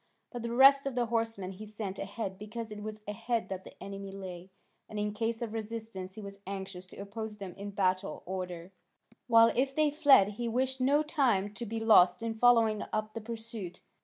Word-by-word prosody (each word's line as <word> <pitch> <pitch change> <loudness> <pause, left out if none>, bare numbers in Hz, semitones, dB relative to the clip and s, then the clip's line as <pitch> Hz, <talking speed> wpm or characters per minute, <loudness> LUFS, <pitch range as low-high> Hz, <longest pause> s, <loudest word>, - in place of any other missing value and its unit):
But 245 - -5
the 235 0 -3
rest 275 +3 +7
of 270 - -3
the 245 -1 +2
horsemen 225 -5 -2
he 200 +3 -9
sent 205 -2 -5
ahead 195 -1 -5
because 220 +2 -6
it 210 0 -7
was 215 0 -7
ahead 225 +3 -2
that 190 -1 -5
the - - -12
enemy 195 0 -7
lay, 185 -2 -8 0.4
and 215 - -7
in 210 0 -1
case 225 +2 -2
of 225 -2 -5
resistance 220 -4 -5
he 215 - -8
was 200 0 -9
anxious 190 -2 -6
to - - -14
oppose 210 +2 -6
them 195 -3 -7
in 200 +1 -7
battle 185 -2 0
order, 180 -1 -5 0.6
while 230 -1 +6
if 270 +2 +1
they 305 -1 +3
fled 285 -10 +6
he 235 +3 -4
wished 260 +3 0
no 285 +4 +4
time 240 - +1
to 235 +2 -5
be 225 +2 -3
lost 185 -4 +5
in 230 -1 -1
following 225 -2 +4
up 215 0 -2
the 225 - -5
pursuit. 225 -4 -5
215 Hz, 200 wpm, -31 LUFS, 195-235 Hz, 0.6 s, rest